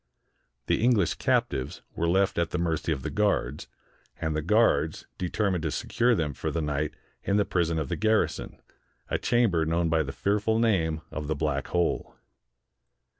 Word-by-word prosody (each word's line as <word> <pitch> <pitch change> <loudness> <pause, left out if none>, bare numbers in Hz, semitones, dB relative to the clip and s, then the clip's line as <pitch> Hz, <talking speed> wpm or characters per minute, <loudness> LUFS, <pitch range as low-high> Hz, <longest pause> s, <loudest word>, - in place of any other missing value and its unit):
The - - +1
English 115 -8 +3
cap - - +2
tives 65 0 -4
were 85 +1 0
left 95 0 +2
at 85 -1 +1
the - - -2
mercy 80 -2 -1
of 65 -4 -2
the - - -3
guards, 100 -10 0 0.5
and 80 -1 -1
the 75 - 0
guards 105 -3 +2
determined 90 0 0
to 80 - -1
secure 120 +10 +1
them 75 -6 -1
for - - -3
the 85 - -2
night 75 -1 -2 0.3
in 100 - +1
the 105 - +3
prison 85 -3 0
of 80 -3 -1
the - - -2
garrison, 110 0 0 0.5
a - - +1
chamber 115 -9 +2
known 85 +1 +1
by 80 -1 +3
the 70 -3 -3
fearful 105 +7 0
name 85 -9 +1
of 75 -2 -5
the 80 - 0
Black 70 -2 -1
Hole. 90 -1 -1
85 Hz, 175 wpm, -27 LUFS, 75-100 Hz, 0.5 s, English